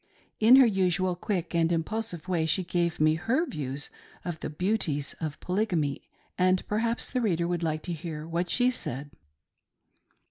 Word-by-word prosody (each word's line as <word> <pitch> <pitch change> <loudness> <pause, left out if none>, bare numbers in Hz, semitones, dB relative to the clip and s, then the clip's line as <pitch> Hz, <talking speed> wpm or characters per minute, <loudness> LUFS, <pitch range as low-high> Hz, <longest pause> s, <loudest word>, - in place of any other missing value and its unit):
In 225 +4 +8
her 265 -1 +8
usual 185 -3 +1
quick 180 -1 -3
and 165 0 +2
impulsive 175 +1 -2
way 170 -3 +1
she 185 +4 +2
gave 175 -1 -1
me 155 0 +4
her 230 - +1
v'lsvfs 145 - -5 0.3
of 175 -3 -4
the - - -4
"beauties" 155 -4 -1
of 155 -3 -4
Polygamy, 180 -7 0 0.4
and 185 0 +3
perhaps 230 +2 0
the 255 - 0
reader 170 -6 +1
would 175 -1 -1
like 155 -2 -1
to 175 - -3
hear 160 -1 -6
what 170 +1 -1
she 250 +5 +3
said. 140 - -4
175 Hz, 165 wpm, -28 LUFS, 160-205 Hz, 0.4 s, In